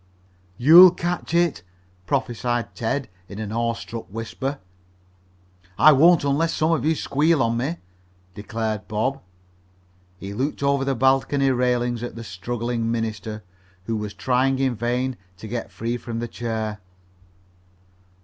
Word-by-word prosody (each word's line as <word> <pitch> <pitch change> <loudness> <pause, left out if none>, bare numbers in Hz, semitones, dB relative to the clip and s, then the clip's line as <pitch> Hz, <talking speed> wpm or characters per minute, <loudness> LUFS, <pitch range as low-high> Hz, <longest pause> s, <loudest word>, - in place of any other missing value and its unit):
"You'll 170 - +9
catch 175 -1 -3
it!" 170 - +2 0.5
prophesied 120 -2 -1
Ted, 125 +3 -2 0.2
in 100 - -8
an 105 -1 -5
awestruck 115 0 -3
whisper. 115 +6 -4 1.2
"I 155 - +8
won't 160 +4 +5
unless 145 +4 +1
some 155 +1 +1
of 160 -6 +1
you 160 +2 +2
squeal 150 0 +2
on 115 0 0
me," 140 +8 -2 0.6
declared 110 +1 -4
Bob. 120 +6 -1 1.0
He 95 +2 -7
looked 135 +6 -2
over 140 -1 +2
the 135 0 0
balcony 135 +2 +2
railing 125 -1 0
at 120 - -6
the 115 - -7
struggling 115 +4 -3
minister, 110 -2 -4 0.4
who 115 +3 -3
was 105 -1 -5
trying 130 +1 +1
in 130 -1 +1
vain 125 +3 -2 0.2
to 110 - -9
get 120 +2 -4
free 115 +2 -3
from 120 -1 -6
the 120 +1 -3
chair. 110 -2 -4
120 Hz, 135 wpm, -23 LUFS, 115-140 Hz, 1.2 s, You'll